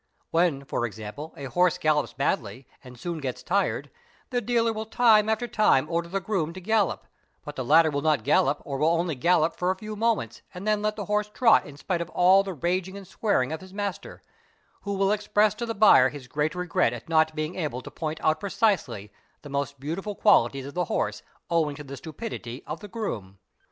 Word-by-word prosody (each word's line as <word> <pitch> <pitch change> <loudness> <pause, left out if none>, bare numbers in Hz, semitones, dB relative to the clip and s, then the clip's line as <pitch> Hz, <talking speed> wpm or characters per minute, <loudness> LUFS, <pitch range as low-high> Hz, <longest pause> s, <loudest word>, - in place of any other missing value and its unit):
When 165 -5 +1
for 120 - -1
example 110 - -8
a 140 - -8
horse 180 +5 +2
gallops 155 -2 +1
badly 125 -2 -2 0.2
and 125 -2 -13
soon 170 +3 -4
gets 130 -4 -5
tired, 200 +2 0 0.4
the 245 -1 0
dealer 230 -2 +1
will 220 0 -5
time 220 -2 +4
after 220 +2 0
time 215 - +3
order 170 0 -1
the 195 +2 -1
groom 175 -5 -2
to 185 - -8
gallop; 210 0 0 0.4
but 150 - -6
_ - - -30
the 130 - -3
latter 160 +5 +5
will 145 0 -1
not 150 -6 +2
gallop 145 +5 +2
or 135 -2 -4
will 155 - +3
only 170 0 +1
gallop 165 +3 +2
for 180 - -1
a 190 - +1
few 215 +1 -7
moments 215 - -1
and 185 +4 -6
then 210 -1 +2
let 215 0 0
the 205 - -5
horse 210 +2 0
trot 230 +2 +4
in 145 -1 -11
spite 175 +3 -2
of 170 - -5
all 185 +3 +5
the 195 -2 -5
raging 180 +5 -2
and 200 - -10
swearing 190 - 0
of 160 - -4
his 190 +1 -13
master, 200 -2 -5 0.6
who 200 -1 -3
will 195 +1 +2
express 210 0 +2
to 235 +2 -5
the 225 - -3
buyer 200 -11 +6
his 140 -3 -10
great 150 +6 -1
regret 180 -9 +1
at 120 - -8
not 160 -1 +2
being 155 +2 -3
able 150 -9 -4
to - - -9
point 160 -1 -4
) - - -17
out 155 0 +2
precisely 185 - -1 0.3
the 145 - -9
most 140 0 -3
beautiful 185 +9 -4
qualities 135 - +3
of 140 - -8
the 180 0 0
horse - - -2 0.3
owing 160 -4 +1
to 150 - -8
the. 140 -1 -8
stupidity 150 - -7
of 155 +2 -5
the 205 - -9
groom. 110 - -5
170 Hz, 220 wpm, -26 LUFS, 145-205 Hz, 0.6 s, buyer